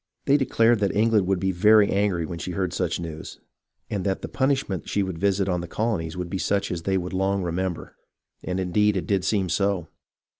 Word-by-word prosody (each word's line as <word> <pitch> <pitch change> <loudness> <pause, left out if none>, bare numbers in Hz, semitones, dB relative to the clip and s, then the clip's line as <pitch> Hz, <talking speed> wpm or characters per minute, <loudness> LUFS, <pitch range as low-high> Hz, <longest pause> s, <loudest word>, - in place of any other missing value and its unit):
They 140 - +4
declared 120 -5 +3
that 100 -2 0
England 105 -3 +3
would 95 -1 +1
be 95 +1 0
very 105 +3 +5
angry 100 -4 +1
when 85 +1 -6
she 90 - -5
heard 90 0 -2
such 90 -3 -1
news, 80 -2 -7 0.5
and 100 -3 -3
that 95 0 -2
the - - -3
punishment 130 -9 -1
she 100 - +1
would 95 -3 -5
visit 100 0 +1
on 90 -2 0
the 85 - -6
colonies 90 -5 -2
would 90 -1 -3
be 95 +2 -4
such 100 +1 0
as 85 -2 -3
they 95 +3 0
would 90 0 -4
long 95 +1 0
remember. 90 0 -3 0.5
And 90 +1 -2
indeed 100 +3 +2
it 90 - -3
did 95 0 0
seem 95 -1 +1
so. 95 -1 0
95 Hz, 215 wpm, -24 LUFS, 90-100 Hz, 0.5 s, very